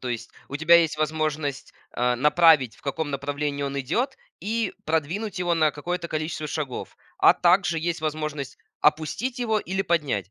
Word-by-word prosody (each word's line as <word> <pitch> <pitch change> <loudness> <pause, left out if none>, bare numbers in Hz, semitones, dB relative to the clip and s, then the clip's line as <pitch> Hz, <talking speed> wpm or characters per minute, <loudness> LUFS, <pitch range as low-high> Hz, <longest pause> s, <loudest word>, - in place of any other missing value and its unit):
То 130 - -5
есть 120 -2 -4 0.2
у 140 - -4
тебя 160 +3 +5
есть 165 -3 +2
возможность, 155 -2 -2 0.2
а, 125 0 +1
направить, 150 -4 +5
в - - -23
каком 145 +2 -3
направлении 145 +1 -2
он 140 0 -2
идёт, 240 - -1 0.2
и 225 +3 -1
продвинуть 175 +6 -2
его 175 -1 +1
на 155 -2 +3
какое-то 170 +4 -4
количество 155 -1 -3
шагов. 140 -5 -5 0.2
А - - +7
также 175 -1 +3
есть 165 0 -2
возможность 155 -3 -4 0.2
опустить 160 - +1
его 220 -3 +1
или 190 +1 -2
поднять. 140 - -1
155 Hz, 165 wpm, -25 LUFS, 140-170 Hz, 0.2 s, А